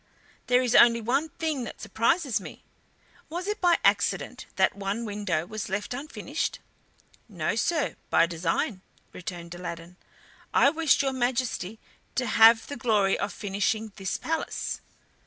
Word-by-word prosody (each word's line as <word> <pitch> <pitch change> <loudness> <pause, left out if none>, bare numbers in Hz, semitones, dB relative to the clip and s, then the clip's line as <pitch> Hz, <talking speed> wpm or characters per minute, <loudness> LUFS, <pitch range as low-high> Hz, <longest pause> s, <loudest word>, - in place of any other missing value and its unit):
There 250 +1 +4
is 245 -1 0
only 235 -1 +7
one 270 +8 0
thing 310 -4 -2
that - - -9
surprises 235 - +1
me. - - -10 0.7
Was 350 +3 -4
it 420 +1 -2
by 350 -2 +5
accident - - +1
that - - +3
one 200 +3 -3
window 205 -6 -2
was 215 +2 -5
left 205 +5 -2
unfinished?" 285 +6 -3 0.7
"No, 175 -1 -2
sir, 305 +5 0
by - - +5
design," 175 - -1 0.3
returned 170 -1 -7
Aladdin. 175 0 -7 0.6
"I - - +6
wished 320 -3 +3
your 270 -1 0
Majesty 240 -5 -1 0.4
to 255 - 0
have 225 0 +6
the 285 - -6
glory 215 -6 +2
of 200 - -2
finishing 205 +2 -2
this 190 -3 -2
palace." 320 0 -3
225 Hz, 140 wpm, -27 LUFS, 195-265 Hz, 0.7 s, only